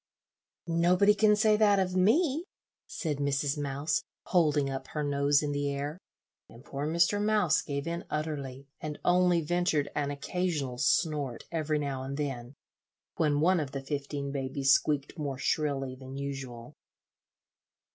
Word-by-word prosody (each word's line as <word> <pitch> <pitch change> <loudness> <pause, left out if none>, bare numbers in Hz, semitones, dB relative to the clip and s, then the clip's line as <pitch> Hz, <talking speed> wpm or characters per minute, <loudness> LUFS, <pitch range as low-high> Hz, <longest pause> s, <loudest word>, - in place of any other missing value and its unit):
"Nobody 175 +4 +4
can 210 0 +4
say 215 0 +4
that 210 -2 +4
of 185 -1 0
me," 280 - +3 0.4
said 155 -5 -3
Mrs. 140 0 0
Mouse, 145 +1 -1 0.2
holding 150 -5 +2
up 135 -1 -5
her 150 - -3
nose 140 0 +2
in 145 - -1
the 145 0 -1
air; 145 +4 -4 0.5
and 120 +4 -15
poor 140 +2 -4
Mr. 170 +6 +2
Mouse 210 -6 +3
gave 140 -1 -4
in 170 +1 -3
utterly, 140 -3 -4
and 150 -1 -5
only 180 -1 +4
ventured 165 -2 0
an 145 -1 -1
occasional 145 -3 -2
snort 145 -7 +1
every 155 -2 0
now 140 -3 -3
and 135 +1 -5
then, 135 -3 -4 0.6
when 150 -2 +2
one 180 +2 +4
of 140 -3 -4
the 135 - -3
fifteen 140 0 -4
babies 135 0 0
squeaked 145 +3 0
more 140 -3 -3
shrilly 135 -2 -1
than 130 +1 -9
usual. 135 -2 -6
145 Hz, 145 wpm, -29 LUFS, 140-170 Hz, 0.6 s, Nobody